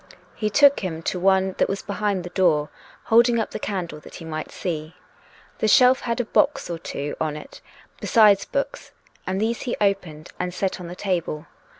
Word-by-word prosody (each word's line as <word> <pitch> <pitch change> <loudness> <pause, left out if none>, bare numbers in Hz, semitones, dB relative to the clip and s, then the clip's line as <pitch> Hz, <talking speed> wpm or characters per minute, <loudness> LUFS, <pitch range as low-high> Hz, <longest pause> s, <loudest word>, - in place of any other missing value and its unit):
He 215 - -2
took 285 +5 +5
him 165 -4 -4
to 180 - -2
one 190 0 +3
that - - +2
was 195 - -3
behind 200 -2 -1
the 175 - -8
door, 160 -6 +2 0.3
holding 235 +1 +4
up 220 - -2
the - - -5
candle 180 -6 -4
that - - -13
he 165 - -9
might 155 -1 -5
see. 160 -3 -5 0.6
The 220 - +1
shelf 250 +4 +6
had 235 +1 -2
a 245 - 0
box 285 - +1
or 170 - -4
two 145 -3 -5
on 155 -1 -1
it, 150 - -12 0.4
besides 210 -5 +5
books, 275 - -4 0.3
and 190 +1 -1
these 225 +2 -1
he 245 - -3
opened 180 -6 -1
and 180 0 -3
set 190 0 -2
on 175 - -7
the 175 - -7
table. 175 -5 -2
190 Hz, 195 wpm, -23 LUFS, 170-215 Hz, 0.6 s, shelf